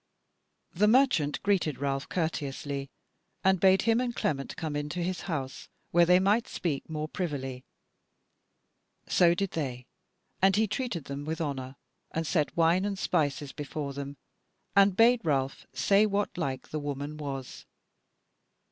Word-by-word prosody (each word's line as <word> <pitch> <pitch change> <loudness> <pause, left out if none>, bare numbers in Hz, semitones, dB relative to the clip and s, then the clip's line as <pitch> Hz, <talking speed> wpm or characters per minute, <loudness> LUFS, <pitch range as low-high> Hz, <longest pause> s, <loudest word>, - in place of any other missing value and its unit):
The 210 +5 +3
merchant 215 - +3
greeted 190 -8 +1
Ralph 135 -1 -2
courteously, 145 -4 -3 0.5
and 190 -1 +4
bade 190 +1 +5
him 230 +1 +3
and 245 -2 -2
Clement 140 -2 -2
come 155 -2 -3
into 145 +3 -3
his 185 +1 -2
house, 135 -5 -4 0.2
where 170 0 +5
they 180 +1 +6
might 205 +5 +2
speak 155 -5 -3
more 155 -1 -3
privily. 135 -7 -4 1.4
So 175 -1 +4
did 195 +1 -1
they, 125 -6 -4 0.6
and 190 0 +5
he 220 +1 +3
treated 210 - -3
them 140 +1 -5
with 160 +3 -3
honour, 135 -4 -3 0.3
and 165 0 -2
set 150 -1 0
wine 170 +3 +4
and 200 -1 -2
spices 145 -5 0
before 145 -1 -5
them, 140 0 -6 0.6
and 200 -1 +5
bade 235 +1 +6
Ralph 135 -4 -1
say 195 +11 +3
whatlike 180 -10 -2
the 155 - -3
woman 145 +1 -4
was. 135 -3 -6
160 Hz, 140 wpm, -29 LUFS, 140-190 Hz, 1.4 s, they